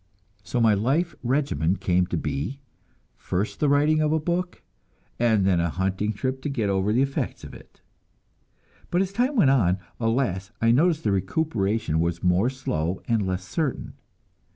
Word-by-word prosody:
So 120 - -3
my 115 -2 +5
life 140 - +1
regimen 120 - 0
came 90 -1 +1
to - - -2
be 90 - -3 0.6
first 100 +4 -3
the 150 - +2
writing 150 +2 +3
of 155 0 +1
a 160 - +2
book, 175 +3 -3 0.6
and 110 -5 +3
then 95 -3 +3
a 85 0 +1
hunting 95 +4 -1
trip 130 +5 -3
to 145 - -3
get 115 -8 -1
over 95 +1 +1
the 125 +5 +3
effects 135 0 -3
of - - -9
it. - - -16 1.1
But 175 +2 +2
as 195 0 -6
time 250 +6 +1
went 150 - +5
on, 95 -9 +3 0.2
alas, 115 -5 0
I 115 0 +3
noticed 160 +5 +3
that - - +1
the - - +1
recuperation 100 - 0
was 85 0 -1
more 90 +6 +3
slow 90 -10 -3
and 110 -5 +1
less 95 0 -2
certain. 155 -6 -2
115 Hz, 175 wpm, -25 LUFS, 95-145 Hz, 1.1 s, my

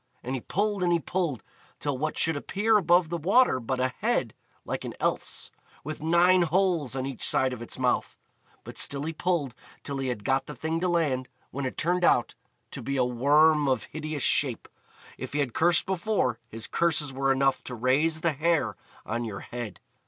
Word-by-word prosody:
and 130 - -4
he 130 - -3
pulled 205 - -1
and 175 -1 +2
he 170 - +3
pulled, 165 - -2 0.4
till 145 -2 -1
what 155 +4 -2
should 165 -1 +2
appear 205 +9 +1
above 175 -4 +4
the 170 0 -2
water 195 - +4
but 130 +2 -3
a 130 0 +2
head - - 0 0.3
like - - -3
an - - -6
elf's, - - -1 0.3
with 155 +1 -6
nine 175 +3 +4
holes 170 -5 +1
on 130 -1 -2
each 135 -3 -6
side 130 -1 +2
of 125 - -7
its 120 - -6
mouth. - - 0 0.5
But - - -7
still 140 0 0
he 160 +2 -3
pulled 160 -6 -1 0.3
till 140 -1 -4
he 135 - -2
had 120 -5 -3
got 135 +3 +1
the 150 - -7
thing 160 +5 -2
to 180 - 0
land, 140 -7 0 0.2
when 140 -1 -3
it - - -7
turned 180 +2 +1
out 120 -8 +3 0.4
to 140 - -7
be 140 +3 -2
a 125 - +3
Worm 145 +4 +4
of 130 - +1
hideous 155 -3 -5
shape. - - +1 0.5
If - - -6
he 145 - 0
had 135 -5 -1
cursed 170 0 +3
before, 185 - 0
his 115 +1 -5
curses 155 -5 +1
were 135 +1 +1
enough 135 0 +2
to 125 - -5
raise 145 +7 +1
the 170 -1 +1
hair 145 - +1 0.3
on 115 +3 -2
your 105 -4 -5
head. 120 -6 -7
145 Hz, 200 wpm, -27 LUFS, 130-170 Hz, 0.5 s, above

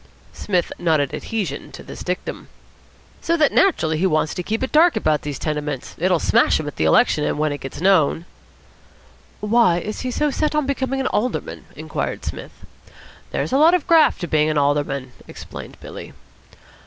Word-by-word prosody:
Psmith 180 -4 -1
nodded 155 -5 +1
adhesion 195 -11 -4
to - - -10
this - - -10
dictum. 180 +1 -4 0.7
"So 335 - +1
that 300 -3 +3
naturally 160 - +2
he 190 - +3
wants 155 -2 0
to - - -4
keep 220 +7 -2
it 260 - -3
dark 330 +3 +5
about 155 -2 +1
these 145 -2 -5
tenements. 150 -3 -4
It'll 180 +1 +2
smash - - +3
him 155 - -4
at 145 - -7
the 80 - +1
election 150 - +3
when 155 0 0
it 145 - -5
gets 135 - -7
known." 170 -3 +3 1.2
"Why 210 -4 +3
is 215 +4 -5
he 255 - -3
so 295 +4 0
set 305 +2 -1
on 300 -2 +1
becoming 270 -1 -1
an - - -3
Alderman," 245 +4 -2
inquired - - -4
Psmith. - - -8 0.6
"There's - - -2
a 270 - +4
lot 325 +4 +6
of 355 - -1
graft 325 -9 +4
to 175 - -3
being 155 -1 +2
an 155 - 0
Alderman," 140 -2 0 0.2
explained - - -10
Billy. - - -10
175 Hz, 180 wpm, -21 LUFS, -, 1.2 s, lot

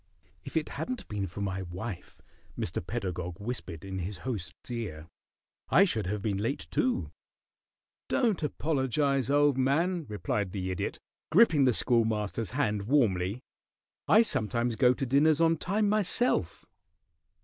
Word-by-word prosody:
"If 140 +3 -4
it 155 - -1
hadn't 255 -2 -5
been 100 -3 -2
for 90 +4 -7
my 95 -1 -2
wife," 90 +2 -7 0.3
Mr. - - -3
Pedagog 90 -2 -4
whispered 100 -7 -5
in 95 -1 -4
his 95 +2 -4
host's 100 -4 -5
ear, 100 -11 -5 0.6
"I 195 - +6
should 110 - -1
have 100 +1 -3
been 100 -3 0
late, 115 +8 -2
too." 250 -1 0 1.0
"Don't 220 -9 +1
apologize, 140 -3 0
old 145 -1 +3
man," 165 +5 +1
replied 100 -1 -2
the 95 -2 -2
Idiot, 90 - -3 0.3
gripping 165 -8 +6
the 130 - +5
Schoolmaster's 110 -2 +1
hand 105 -8 0
warmly. 105 -5 +1 0.6
"I 220 +2 +7
sometimes 120 - 0
go 125 +1 +4
to 135 - -2
dinners 145 +4 +4
on 165 0 +4
time 205 +6 0
myself." 215 +4 +1
120 Hz, 140 wpm, -29 LUFS, 100-150 Hz, 1.0 s, I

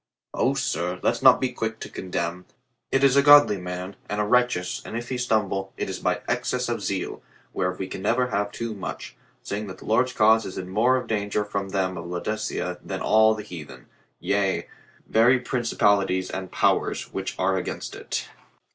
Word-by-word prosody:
"O, - - +1
sir, 90 +2 -2
let's 120 - +1
not 130 -1 +7
be 130 -1 0
quick 115 -2 -3
to - - -5
condemn. 90 -1 -4 0.5
It 135 0 +2
is 135 -1 +5
a 140 - +7
godly 145 -7 +7
man 90 +1 -6
and 105 - -2
a - - +2
righteous, 120 -5 +1
and 115 - -5
if 120 0 -6
he 130 - -2
stumble, 100 -5 0
it - - -3
is - - -5
by - - 0
excess - - -1
of - - -2
zeal, - - -3 0.3
whereof 90 0 -1
we 95 - -4
can 95 - -7
never 120 +5 +1
have 100 -2 -1
too 115 0 -4
much, 95 -3 -7 0.3
seeing 105 +1 -4
that 95 -1 -8
the - - -13
Lord's 125 +4 +2
cause 110 +1 +5
is 95 - -7
in 90 - -5
more 120 +7 +3
of 130 - -4
danger 105 -1 -1
from 100 -1 -3
them 95 -1 -1
of 85 - -7
Laodicea 90 0 -3
than 95 -1 -5
all 110 0 +5
the 105 - -6
heathen, 75 - -10 0.3
yea, 100 -2 0 0.4
very 120 +4 +4
principalities 100 -7 +1
and 95 -1 -5
powers, - - 0
which - - -4
are 95 +1 +1
against 95 - -4
it." - - -4
105 Hz, 190 wpm, -25 LUFS, 95-115 Hz, 0.5 s, not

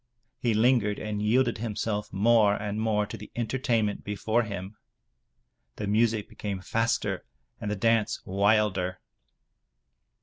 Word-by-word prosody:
He 115 -3 +1
lingered 110 -2 +3
and 105 -1 -3
yielded 120 +2 +2
himself 105 -2 -2
more 105 0 +4
and 105 +1 -3
more 105 -2 +1
to 105 - -7
the 105 - -11
entertainment 120 -3 0
before 110 +3 0
him. 100 -2 -6 1.0
The 105 - -4
music 110 0 +2
became 100 -2 -5
faster 105 -1 -1 0.4
and 105 - -4
the 105 - -1
dance 115 +1 +2
wilder. 100 -2 +1
105 Hz, 125 wpm, -27 LUFS, 100-115 Hz, 1.0 s, more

